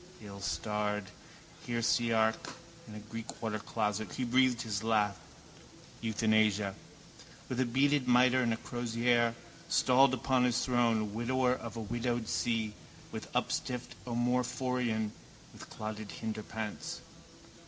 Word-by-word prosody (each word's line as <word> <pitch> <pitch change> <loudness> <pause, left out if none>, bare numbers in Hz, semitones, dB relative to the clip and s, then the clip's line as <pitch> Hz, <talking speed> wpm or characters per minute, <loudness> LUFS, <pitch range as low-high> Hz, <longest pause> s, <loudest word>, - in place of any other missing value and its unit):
Illstarred 105 0 -3 0.6
heresiarch! 115 -1 +1 0.3
In 105 - -9
a - - -6
Greek 115 +2 -8
watercloset 110 -2 -2
he 130 - -2
breathed 125 0 +3
his 105 -2 -2
last: 105 -4 +2 0.8
euthanasia. 110 -2 +2 0.7
With 125 -1 -1
beaded 140 +1 +3
mitre 125 +1 +5
and 120 - +1
with 115 0 -2
crozier, 120 0 +1 0.3
stalled 130 +1 +5
upon 130 0 +2
his 125 0 +2
throne, 115 -4 +2
widower 125 +2 +2
of 115 -3 -6
a - - -3
widowed 120 +1 -2
see, 110 -3 0 0.4
with - - -6
upstiffed 125 -1 -1
omophorion, 125 -2 0 0.4
with - - -11
clotted 110 -1 -6
hinderparts. 110 0 -5
115 Hz, 110 wpm, -32 LUFS, 110-125 Hz, 0.8 s, mitre